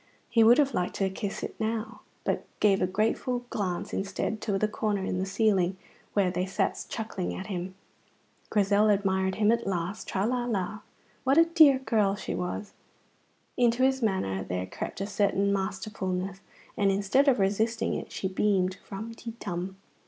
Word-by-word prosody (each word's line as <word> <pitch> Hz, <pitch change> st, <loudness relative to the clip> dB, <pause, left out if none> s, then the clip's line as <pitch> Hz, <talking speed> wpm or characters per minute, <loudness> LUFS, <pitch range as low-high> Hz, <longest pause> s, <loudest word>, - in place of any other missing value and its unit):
He 230 Hz, -1 st, +5 dB
would 235 Hz, +3 st, +7 dB
have 280 Hz, -2 st, +3 dB
liked 180 Hz, -, -1 dB
to 195 Hz, -1 st, 0 dB
kiss 195 Hz, +1 st, -4 dB
it -, -, -4 dB
now, 220 Hz, +1 st, -3 dB, 0.2 s
but -, -, -1 dB
gave 200 Hz, -2 st, +4 dB
a 185 Hz, -, +3 dB
grateful 225 Hz, +5 st, 0 dB
glance 185 Hz, -4 st, -2 dB
instead 200 Hz, +2 st, -2 dB
to 205 Hz, -3 st, 0 dB
the 215 Hz, -, +1 dB
corner 210 Hz, -2 st, -1 dB
in 185 Hz, -, -1 dB
the 190 Hz, -, -1 dB
ceiling 195 Hz, -3 st, +2 dB, 0.4 s
where 195 Hz, -3 st, +2 dB
they 180 Hz, +1 st, -1 dB
sat 190 Hz, -, -1 dB
chuckling 215 Hz, -5 st, -3 dB
at 190 Hz, -, -6 dB
him. 185 Hz, +1 st, -4 dB, 0.7 s
Grizel 205 Hz, 0 st, +3 dB
admired 190 Hz, -2 st, +1 dB
him 215 Hz, 0 st, +3 dB
at 235 Hz, -2 st, 0 dB
last. 180 Hz, +1 st, -3 dB
Tra, 195 Hz, +1 st, 0 dB
la, 245 Hz, +1 st, 0 dB
la! 210 Hz, -3 st, -2 dB, 0.4 s
What 270 Hz, +3 st, +3 dB
a 330 Hz, -, +8 dB
dear 315 Hz, -5 st, +6 dB
girl 215 Hz, -6 st, +1 dB
she -, -, -5 dB
was! 180 Hz, +3 st, -4 dB, 0.8 s
Into 240 Hz, +1 st, +3 dB
his 265 Hz, 0 st, +3 dB
manner 95 Hz, -, 0 dB
there 90 Hz, 0 st, -3 dB
crept 95 Hz, -, -6 dB
a -, -, 0 dB
certain 200 Hz, -1 st, +1 dB
masterfulness, 190 Hz, -1 st, -3 dB, 0.4 s
and 200 Hz, -1 st, +2 dB
instead 200 Hz, +9 st, +2 dB
of 265 Hz, -2 st, +5 dB
resisting 215 Hz, +4 st, +1 dB
it -, -, -5 dB
she 190 Hz, -, -2 dB
beamed. 185 Hz, -1 st, +1 dB
Rum 220 Hz, +3 st, -6 dB
ti 230 Hz, 0 st, -8 dB
tum! 185 Hz, 0 st, -4 dB
200 Hz, 175 wpm, -28 LUFS, 190-225 Hz, 0.8 s, a